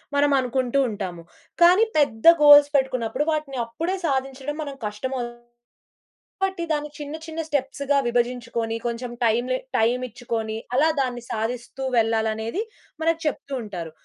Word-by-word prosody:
మనం 285 Hz, 0 st, +3 dB
అనుకుంటూ 255 Hz, +1 st, 0 dB
ఉంటాము. 185 Hz, -5 st, -5 dB, 0.4 s
కానీ, 365 Hz, +6 st, +7 dB
పెద్ద 225 Hz, -6 st, 0 dB, 0.2 s
గోల్స్ 290 Hz, 0 st, +9 dB
పెట్టుకున్నప్పుడు 260 Hz, 0 st, 0 dB
వాటిని 300 Hz, -4 st, -2 dB
అప్పుడే 330 Hz, +11 st, -3 dB
సాధించడం 270 Hz, +1 st, -2 dB
మనకి 275 Hz, -2 st, -8 dB
కష్టమవుతుంది. 240 Hz, +2 st, -5 dB, 0.9 s
కాబట్టి 380 Hz, -3 st, -1 dB
దాన్ని 300 Hz, -1 st, -1 dB
చిన్న, 295 Hz, 0 st, -6 dB
చిన్న 320 Hz, 0 st, -4 dB
స్టెప్స్ 280 Hz, -1 st, -2 dB
గా 280 Hz, -, +5 dB
విభజించుకొని, 235 Hz, -1 st, -1 dB
కొంచెం 235 Hz, +1 st, -4 dB
టైం 230 Hz, +2 st, +2 dB
లె 255 Hz, -, +1 dB, 0.2 s
టైం 235 Hz, +3 st, +2 dB
ఇచ్చుకొని, 225 Hz, -2 st, -4 dB, 0.2 s
అలా 310 Hz, +4 st, +4 dB
దాన్ని 245 Hz, -2 st, -3 dB
సాధిస్తూ 240 Hz, +4 st, -4 dB
వెళ్ళాలనేది 225 Hz, -, 0 dB, 0.4 s
మనకు 330 Hz, 0 st, +2 dB
చెప్తూ 280 Hz, -1 st, -4 dB
ఉంటారు. 175 Hz, -6 st, -6 dB
255 Hz, 130 wpm, -24 LUFS, 230-290 Hz, 0.9 s, గోల్స్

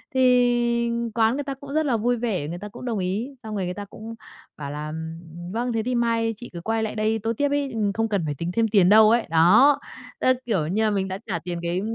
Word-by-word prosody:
thì 240 Hz, -2 st, +3 dB, 0.3 s
quán 225 Hz, 0 st, +3 dB
người 290 Hz, -, -2 dB
ta 275 Hz, -1 st, -4 dB
cũng 280 Hz, +1 st, -10 dB
rất 315 Hz, 0 st, +1 dB
là 245 Hz, -5 st, +1 dB
vui 240 Hz, +2 st, +1 dB
vẻ, 205 Hz, -11 st, -2 dB
người 170 Hz, +2 st, -5 dB
ta 210 Hz, +1 st, -7 dB
cũng 250 Hz, -, -10 dB
đồng 225 Hz, -4 st, -1 dB
ý, 195 Hz, +8 st, -2 dB
xong 215 Hz, -1 st, -6 dB
người 190 Hz, -2 st, -1 dB
người 180 Hz, -, -3 dB
ta 205 Hz, +1 st, -7 dB
cũng 225 Hz, +3 st, -9 dB, 0.4 s
bảo 140 Hz, -1 st, -6 dB
là, 150 Hz, +1 st, -5 dB
ừm, 160 Hz, +1 st, -6 dB, 0.2 s
ừm, 175 Hz, +1 st, -8 dB
"Vâng, 240 Hz, +2 st, -2 dB
thế 220 Hz, -1 st, 0 dB
thì 250 Hz, +1 st, -1 dB
mai 230 Hz, -1 st, +1 dB
chị 240 Hz, -, -9 dB
cứ 170 Hz, -, -6 dB
quay 225 Hz, +3 st, -1 dB
lại 220 Hz, -, -3 dB
đây 220 Hz, +1 st, 0 dB
tô 225 Hz, +2 st, -1 dB
tiếp" 285 Hz, 0 st, +1 dB
ấy, 285 Hz, -2 st, 0 dB
ừ, 210 Hz, -3 st, 0 dB
"Không 225 Hz, 0 st, -1 dB
cần 195 Hz, -6 st, 0 dB
phải 145 Hz, -2 st, -3 dB
tính 170 Hz, +4 st, -4 dB
thêm 225 Hz, -1 st, +2 dB
tiền 195 Hz, -4 st, +4 dB
đâu" 215 Hz, +1 st, +7 dB
ấy. 235 Hz, -2 st, +2 dB
Đó, 195 Hz, -, +5 dB, 0.4 s
tức 255 Hz, -1 st, +3 dB
kiểu 185 Hz, -10 st, 0 dB
như 210 Hz, +6 st, 0 dB
là, 215 Hz, -, +2 dB
mình 195 Hz, -1 st, 0 dB
đã 190 Hz, 0 st, -4 dB
trả 170 Hz, -4 st, -2 dB
tiền 175 Hz, +1 st, -5 dB
cái 175 Hz, +2 st, -1 dB
220 Hz, 270 wpm, -24 LUFS, 180-240 Hz, 0.4 s, đâu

